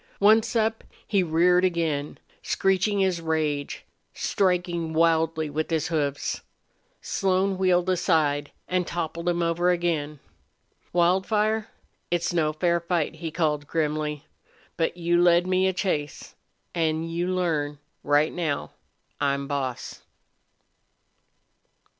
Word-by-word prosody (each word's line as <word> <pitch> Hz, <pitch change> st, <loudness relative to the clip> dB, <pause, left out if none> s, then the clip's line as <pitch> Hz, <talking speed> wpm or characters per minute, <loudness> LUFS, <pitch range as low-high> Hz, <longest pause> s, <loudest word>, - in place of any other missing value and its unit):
Once 220 Hz, +3 st, +4 dB
up, 225 Hz, 0 st, +1 dB, 0.2 s
he 200 Hz, -3 st, +2 dB
reared 180 Hz, +2 st, +3 dB
again, 165 Hz, -5 st, -1 dB, 0.2 s
screeching 195 Hz, +1 st, +1 dB
his 185 Hz, -3 st, +1 dB
rage, 155 Hz, -3 st, -2 dB, 0.3 s
striking 175 Hz, -4 st, 0 dB
wildly 160 Hz, -1 st, +2 dB
with 155 Hz, +2 st, -3 dB
his 160 Hz, -2 st, 0 dB
hoofs. 145 Hz, -4 st, -1 dB, 0.6 s
Slone 190 Hz, 0 st, +1 dB
wheeled 185 Hz, -1 st, +2 dB
aside 155 Hz, -6 st, +1 dB, 0.2 s
and 180 Hz, -1 st, 0 dB
toppled 170 Hz, 0 st, -3 dB
him 175 Hz, 0 st, 0 dB
over 170 Hz, +1 st, +1 dB
again. 165 Hz, -4 st, 0 dB, 0.7 s
"Wildfire, 210 Hz, +5 st, +2 dB, 0.4 s
it's 175 Hz, +1 st, 0 dB
no 155 Hz, -3 st, +2 dB
fair 170 Hz, +2 st, +1 dB
fight," 170 Hz, -2 st, -1 dB
he 165 Hz, -, -4 dB
called, 150 Hz, -3 st, -1 dB
grimly. 150 Hz, -2 st, -2 dB, 0.5 s
"But 165 Hz, +1 st, -1 dB
you 175 Hz, 0 st, +2 dB
led 175 Hz, 0 st, +5 dB
me 185 Hz, +1 st, +2 dB
a -, -, +2 dB
chase. 175 Hz, -6 st, -3 dB, 0.4 s
An' 160 Hz, -1 st, 0 dB
you 165 Hz, +2 st, -2 dB
learn 160 Hz, -6 st, -1 dB, 0.3 s
right 145 Hz, +2 st, +2 dB
now 160 Hz, -5 st, -2 dB, 0.5 s
I'm 140 Hz, 0 st, 0 dB
boss!" 135 Hz, -3 st, -4 dB
170 Hz, 115 wpm, -25 LUFS, 155-180 Hz, 0.7 s, led